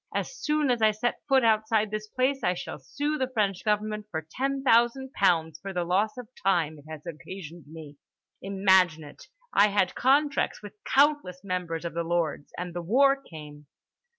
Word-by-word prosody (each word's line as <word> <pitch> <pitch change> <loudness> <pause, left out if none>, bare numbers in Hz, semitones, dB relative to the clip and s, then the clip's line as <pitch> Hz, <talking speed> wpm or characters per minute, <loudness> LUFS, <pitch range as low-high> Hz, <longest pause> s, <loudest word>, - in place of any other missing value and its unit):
As - - -2
soon 300 - 0
as 240 -2 0
I 220 - +6
set 215 +3 -2
foot 265 -2 +4
outside 220 -1 +2
this 215 0 -4
place, 260 +4 -1
I 180 0 +2
shall 170 - -7
sue 295 - -3
the 260 -1 -1
French 200 -6 0
government 210 0 -1
for 160 -5 -4
ten 270 +4 -2
thousand 255 +2 +3
pounds 165 -5 +1
for 195 0 -7
the 180 -1 -1
loss 195 +7 0
of 250 -3 -8 0.2
time 165 -6 +1
it 145 - -18
has 155 0 -9
occasioned 170 0 -9
me. 155 -2 -11 0.4
Imagine 190 -4 +3
it—I 485 - -1
had 200 -3 +1
contracts 280 -2 +1
with 205 - -9
countless 280 -11 +2
members 180 -3 -3
of 170 - -4
The 170 - -1
Lords—and 170 +1 -3
the 175 - -4
war 270 +10 +4
came. 150 - -12
200 Hz, 175 wpm, -27 LUFS, 170-255 Hz, 0.4 s, I